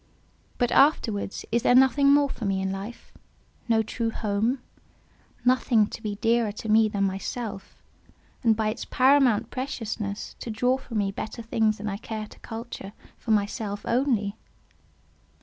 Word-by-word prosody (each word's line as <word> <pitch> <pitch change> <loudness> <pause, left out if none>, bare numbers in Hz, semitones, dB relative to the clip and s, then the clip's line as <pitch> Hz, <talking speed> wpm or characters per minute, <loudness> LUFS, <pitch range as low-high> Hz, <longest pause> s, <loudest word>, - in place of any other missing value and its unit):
But 245 - +1
afterwards, 225 -9 +2
is 235 +1 +2
there 245 - +4
nothing 270 +2 +5
more 285 0 +5
for 265 - -7
me 195 -1 0
in 190 0 -1
life—no 220 +2 -5
true 230 +1 -2
home—nothing 235 +1 -1
to - - -7
be 210 -2 -3
dearer 230 0 +1
to 220 - -7
me 215 0 +5
than 200 -1 -1
myself, 195 +2 -4 0.6
and 225 -3 +4
by 215 0 0
its 215 - -4
paramount 260 -4 +3
preciousness, 220 -6 -4
to - - -6
draw 245 +4 +1
from 235 -4 -6
me 200 -1 +1
better 220 +3 -6
things 220 -1 +1
than 210 - -5
I 200 -1 -2
care 215 0 -5
to - - -16
culture 225 -3 -7 0.3
for - - -10
myself 205 -1 0
only? 235 -5 +1
225 Hz, 150 wpm, -26 LUFS, 205-245 Hz, 0.6 s, nothing